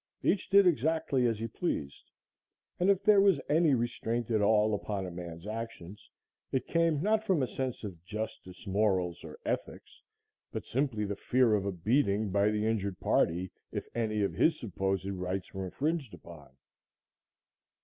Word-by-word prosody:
Each 190 -1 +1
did 200 0 +7
exactly 150 -5 +2
as 115 -2 0
he 115 +2 -3
pleased, 90 - -4 0.7
and 180 +2 +3
if 200 0 +3
there 205 -1 +6
was 195 -7 +4
any 155 -2 +4
restraint 120 -1 -2
at 110 -2 +2
all 105 +1 +4
upon 100 -1 -2
a 90 - -6
man's 85 0 -8
actions, 105 -4 -7 0.4
it 130 - 0
came 165 -3 +1
not 215 +1 +2
from 185 -10 +2
a - - 0
sense 130 +2 -4
of 90 -6 -7
justice, 105 -2 -6
morals 95 -4 0
or - - -9
ethics, - - -4 0.5
but - - -5
simply 120 -5 -1
the 100 0 -3
fear 125 +1 +2
of 100 -1 +1
a - - 0
beating 105 - +1
by 100 +2 +3
the 105 0 0
injured 100 -4 -1
party, 90 +2 +1 0.2
if - - -4
any 110 -3 0
of 100 - 0
his 160 -1 +2
supposed 95 -3 -2
rights 95 -1 -4
were 95 -1 -4
infringed 145 - -2
upon. 80 -5 -13
110 Hz, 165 wpm, -31 LUFS, 95-140 Hz, 0.7 s, did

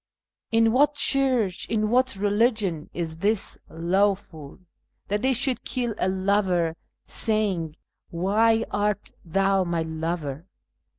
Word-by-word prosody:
In 225 0 +4
what 290 +4 +3
church, 255 -10 +2
in 215 -1 0
what 255 0 +2
religion, 205 -5 0
is 165 -2 -5
this 205 +4 0
lawful, 170 -3 -1 0.5
That 205 +1 0
they 260 +2 +2
should 250 -1 +1
kiU 240 -2 -2
a 185 - +1
lover, 185 -3 +1 0.3
saying, 195 -8 0 0.2
" - - -59
Why 220 +6 +2
art 205 0 -1
thou 195 +3 +1
my 170 -2 -1
lover 160 -1 -4
200 Hz, 120 wpm, -25 LUFS, 170-225 Hz, 0.5 s, In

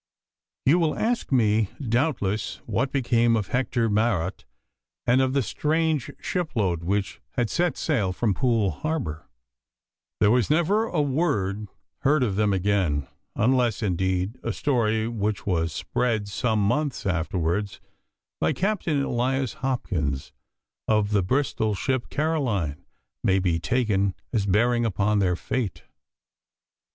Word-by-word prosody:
You 155 +7 +5
will 160 -3 +1
ask 235 -5 -1
me 110 -5 +3
doubtless 115 -5 0
what 130 +3 -1
became 120 -3 +2
of 105 -4 -2
Hector 125 -2 0
Marot 105 -4 0 0.6
and 125 +2 +4
of 130 0 +1
the 140 -1 +2
strange 155 +2 0
shipload 110 - -1
which 100 +3 -1
had 120 -3 0
set 175 0 +1
sail 115 - 0
from 105 +2 0
Poole 110 -2 +1
Harbour. 145 - -4 0.9
There 105 0 +5
was 120 -3 +2
never 175 +8 +3
a 165 -9 0
word 120 - 0 0.3
heard 145 0 +3
of 105 -6 0
them 105 0 +2
again, 95 -7 +1 0.3
unless 120 -1 +2
indeed 95 +4 -1
a - - -2
story 110 -5 +1
which 105 -3 -2
was 85 -4 0
spread 110 +4 -1
some 110 +1 0
months 140 +2 -1
afterwards 90 +2 -1 0.6
by 80 - +2
Captain 175 -8 0
Elias 130 0 0
Hopkins, 85 - -2 0.5
of 105 -1 +2
the 105 -2 +3
Bristol 110 -1 0
ship 130 +4 -1
Caroline, 125 - -1 0.4
may 95 - +3
be 90 -3 +1
taken 100 -3 +1 0.2
as 105 -4 +1
bearing 120 +5 +3
upon 105 -1 +1
their 90 -2 +2
fate. 110 +2 -3
110 Hz, 130 wpm, -25 LUFS, 100-130 Hz, 0.9 s, You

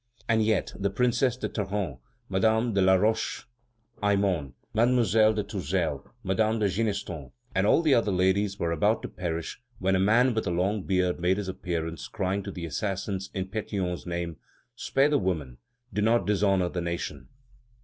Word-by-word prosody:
And 110 -1 +3
yet, 110 -2 +1
the 100 0 -1
Princess 125 +3 +1
de - - -2
Tarente, 95 - -3 0.3
Madame 110 +4 +2
de 100 - +2
La 95 0 +6
Roche 110 +4 0 0.6
Aymon, 100 -9 +1 0.2
Mademoiselle 110 -2 +4
de 105 - 0
Tourzel, 90 -7 -2 0.2
Madame 110 +3 +1
de 105 -2 +2
Ginestons, 100 -7 -2 0.2
and 95 +1 +2
all 165 - +4
the 155 -4 +4
other 115 -4 +3
ladies 95 +2 +1
were 85 -4 -1
about 105 +6 +1
to - - -3
perish 85 +2 -4 0.2
when 95 0 +1
a - - +2
man 120 +6 +4
with 110 -2 -1
a - - +1
long 95 +4 0
beard 90 -2 +1
made 90 +2 +2
his 105 -2 -3
appearance, 85 -3 -4
crying 95 0 -1
to - - -7
the 85 -2 -6
assassins 95 +4 -3
in 95 -1 -1
Pétion's 95 -3 -3
name: 85 -2 -3 0.4
"Spare 140 +2 +2
the 145 - +3
women; 75 -10 -2 0.3
do 105 - 0
not 115 +3 +3
dishonor 95 -3 +2
the 90 - -3
nation." 80 -6 -4
95 Hz, 170 wpm, -27 LUFS, 90-110 Hz, 0.6 s, La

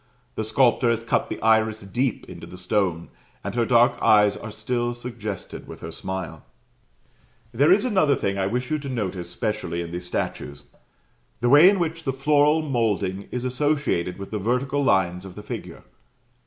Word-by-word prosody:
The 110 - -3
sculptor 120 +2 +3
has 115 -1 0
cut 115 - 0
the - - -5
iris 110 -1 +3
deep 120 +5 -2
into - - -10
the 90 - -11
stone, 90 -3 -1 0.3
and - - -4
her 120 -1 0
dark 120 -1 +4
eyes 105 -1 +5
are 110 - -7
still 120 +3 -2
suggested 115 -6 -7
with - - -10
her - - -6
smile. 95 -3 -6 1.1
There 140 +7 +3
is 200 +4 +4
another 185 - +3
thing 100 -5 -1
I 95 -1 0
wish 125 +5 -3
you 155 - +1
to 140 -1 -6
notice 95 -8 -3
specially 105 -7 -3
in 85 -1 -5
these 90 +1 -5
statues 70 -4 -5 0.7
the 120 - +1
way 150 +7 +8
in 200 - +2
which 165 -2 -2
the 135 - -1
floral 150 +3 +3
moulding 105 -8 -1
is 125 0 -4
associated 130 - 0
with 100 0 -8
the 105 - -2
vertical 125 +7 0
lines 90 -6 +2
of 95 -2 -10
the 105 - -9
figure. - - -7
115 Hz, 180 wpm, -24 LUFS, 95-135 Hz, 1.1 s, way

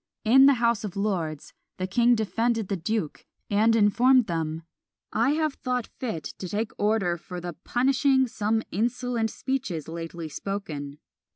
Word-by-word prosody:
In 265 +5 +7
the 280 - +6
House 235 -2 +1
of 205 -4 -5
Lords 180 -7 -2 0.2
the 185 - -2
king 235 +6 +3
defended 225 0 0
the 200 - 0
duke, 185 -2 -3 0.3
and 220 +3 +4
informed 240 +4 +5
them, 165 -2 -3 0.5
"I 235 +6 +2
have 310 -1 0
thought 250 -3 -2
fit 220 - -3 0.2
to 185 - -5
take 215 +3 -2
order 205 -5 +1
for 180 +2 -8
the 175 0 -5
punishing 265 +1 +2
some 220 0 -1
insolent 235 +2 -1
speeches 230 - -3
lately 165 0 -6
spoken." 150 -5 -5
215 Hz, 150 wpm, -26 LUFS, 175-245 Hz, 0.5 s, In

